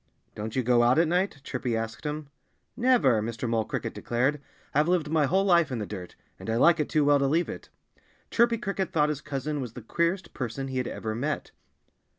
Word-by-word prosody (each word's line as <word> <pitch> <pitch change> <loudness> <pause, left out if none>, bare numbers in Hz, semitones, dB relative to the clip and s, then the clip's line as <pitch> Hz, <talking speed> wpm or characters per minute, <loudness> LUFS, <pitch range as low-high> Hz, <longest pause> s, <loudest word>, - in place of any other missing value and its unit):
"Don't 110 +1 -5
you 130 - +1
go 120 0 +4
out 120 +3 +4
at 165 0 +4
night?" 180 -3 0
Chirpy 125 -3 -2
asked 115 +5 -5
him. 150 -1 -4 0.5
"Never!" 235 - +3
Mr. 115 +2 -3
Mole 115 -1 +1
Cricket - - -4
declared. 135 +5 0 0.3
"I've 150 +3 +3
lived 170 -4 +1
my 155 -3 +3
whole 190 +5 +2
life 170 -6 +4
in 125 - -2
the 105 - -3
dirt. 95 -4 -8 0.2
And - - -7
I 110 - +1
like 170 +8 +5
it 150 - 0
too 150 -2 +2
well 145 0 +5
to 140 - +2
leave 165 +5 +1
it." - - -8 0.6
Chirpy 235 0 +3
Cricket 195 -4 -3
thought 150 -2 +2
his 150 -2 -3
cousin 145 +1 -3
was 120 -3 -6
the 125 - -9
queerest 170 - -1
person 135 +2 -4
he 130 -1 -2
had 125 - -2
ever 110 -1 -4
met. 140 +7 -3
145 Hz, 215 wpm, -27 LUFS, 120-170 Hz, 0.6 s, like